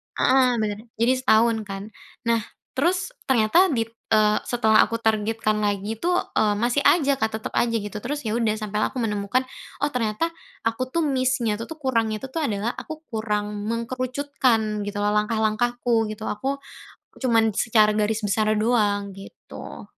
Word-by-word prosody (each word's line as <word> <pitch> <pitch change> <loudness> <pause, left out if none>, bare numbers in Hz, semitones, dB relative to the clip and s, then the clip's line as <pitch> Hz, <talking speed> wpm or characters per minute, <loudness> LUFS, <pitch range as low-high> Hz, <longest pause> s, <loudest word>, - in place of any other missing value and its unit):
Heeh, 255 -1 +4
bener. 210 -2 -2 0.2
Jadi 235 +3 +2
setahun 230 -2 +4
kan, 195 0 -5 0.4
nah, 230 -1 +2 0.4
terus 360 - +1 0.2
ternyata 265 - +4
di 230 - +2 0.3
eee, 215 -1 +4
setelah 220 -3 +3
aku 230 - -2
targetkan 215 0 +1
lagi 205 +1 -1
tuh, 355 +1 +1 0.4
masih 240 +5 +1
aja, 285 -4 +4
Kak, 220 - +1
tetep 220 - -7
aja 230 -1 +1
gitu 205 0 -5
terus, 290 +1 -4
ya 215 - -1
udah, 225 -2 +1
sampai 210 -1 -3
aku 260 - -1
menemukan, 215 +2 0 0.4
"Oh, 295 - -2
ternyata 250 +8 -1 0.3
aku 255 +3 -1
tuh 330 +2 0
miss-nya 255 -5 +1
itu 230 - -7
tuh, 320 - -7
kurang 240 -6 0
itu 215 +4 -4
tuh 325 - -1
adalah 220 -3 -1
aku 315 0 -8
kurang 210 -1 -2
mengerucutkan, 245 -2 0
gitu 205 0 -5
loh, 205 0 +1
langkah-langkahku, 225 +1 +1
gitu. 215 +1 -6
Aku 270 +7 -2 0.6
cuman 225 -4 +3
secara 215 0 +3
garis 215 +1 0
besar 215 +1 +1
doang, 205 -3 +1
gitu. 195 +1 -10
225 Hz, 155 wpm, -24 LUFS, 210-255 Hz, 0.6 s, Heeh